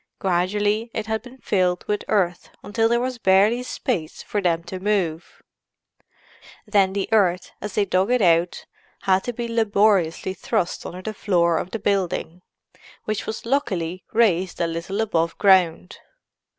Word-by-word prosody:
Gradually 205 +5 0
it 220 - -2
had 220 +1 -2
been 250 +1 -13
filled 185 -7 0
with 210 0 -1
earth 180 -4 0
until 225 +2 +1
there 235 0 +2
was 250 0 -3
barely 205 +5 +4
space 235 - -3
for 205 - -2
them 170 -3 +1
to 185 +2 -7
move; 185 -5 -2 1.2
then 200 -3 +2
the 200 -1 -2
earth 185 -5 +2
as 210 -1 -6
they 205 - +2
dug 185 +2 +1
it 250 0 +3
out 170 -3 +2 0.4
had 190 0 +2
to 245 - -1
be 235 0 -4
laboriously 205 -6 +2
thrust 180 -2 -2
under 185 +1 -8
the 220 - -4
floor 170 -5 +1
of 180 - -5
the 225 - -3
building, 185 -4 -1 0.6
which 215 0 -3
was 220 - -5
luckily 185 - -1
raised 190 -6 +2
a 170 - +2
little 170 +5 -3
above 170 -6 0
ground. 185 -3 +3
195 Hz, 155 wpm, -23 LUFS, 180-220 Hz, 1.2 s, barely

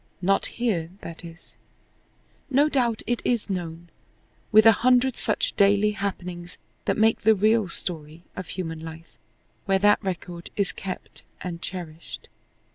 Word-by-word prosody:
Not 195 +2 +3
here, 195 -10 -1
that 165 +1 -8
is. 165 0 -12 0.9
No 285 +3 +4
doubt 240 -6 +1
it 240 -1 -1
is 235 -4 0
known, 170 -2 -5 0.6
with 215 0 +7
a 225 - +10
hundred 250 +1 +4
such 215 - -1
daily 200 +1 +4
happenings 180 -4 -5 0.3
that - - +1
make 220 +1 +3
the 220 +1 +5
real 215 0 +3
story 160 -1 -5
of 185 -3 -6
human 165 -3 -4
life, 160 0 -10 0.5
where 195 -1 +3
that 205 +2 +4
record 175 -2 -5
is 200 -2 0
kept 190 -2 -7 0.2
and 175 -2 -5
cherished. 170 -4 -7
190 Hz, 140 wpm, -25 LUFS, 170-220 Hz, 0.9 s, a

